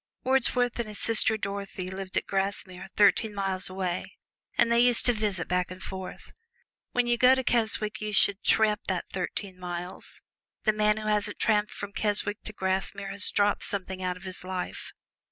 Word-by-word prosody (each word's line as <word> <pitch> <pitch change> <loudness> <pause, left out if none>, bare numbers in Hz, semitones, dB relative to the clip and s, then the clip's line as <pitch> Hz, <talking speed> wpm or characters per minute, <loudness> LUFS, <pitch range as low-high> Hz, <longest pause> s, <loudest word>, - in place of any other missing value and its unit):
Wordsworth 250 -2 +1
and 235 - -2
his 210 -1 -8
sister 220 -1 +2
Dorothy 200 -2 -5
lived 190 0 -4
at - - 0
Grasmere, 195 -1 -3
thirteen 210 +1 +3
miles 190 -2 -1
away, 185 -1 -4 0.4
and 235 -1 +3
they 235 - +4
used 245 0 +4
to 245 - +5
visit 210 -5 -2
back 180 0 0
and 185 0 -9
forth. 190 -1 -8 0.6
When 245 0 +1
you 240 0 +1
go 255 +1 +6
to 260 - -2
Keswick 220 -3 0
you 215 0 -3
should 200 0 +3
tramp 215 -1 +3
that 185 -2 -2
thirteen 185 0 -4
miles 180 0 -6 0.4
the 215 - +3
man 210 0 +2
who 215 0 -5
hasn't 210 -1 0
tramped 210 -1 +1
from 200 0 -7
Keswick 205 0 +5
to - - -3
Grasmere 195 0 -2
has 200 +1 +6
dropped 205 0 +1
something 190 -1 -3
out 180 -1 -2
of 180 - -15
his 185 -1 -7
life. 185 0 -5
200 Hz, 180 wpm, -27 LUFS, 190-215 Hz, 0.6 s, go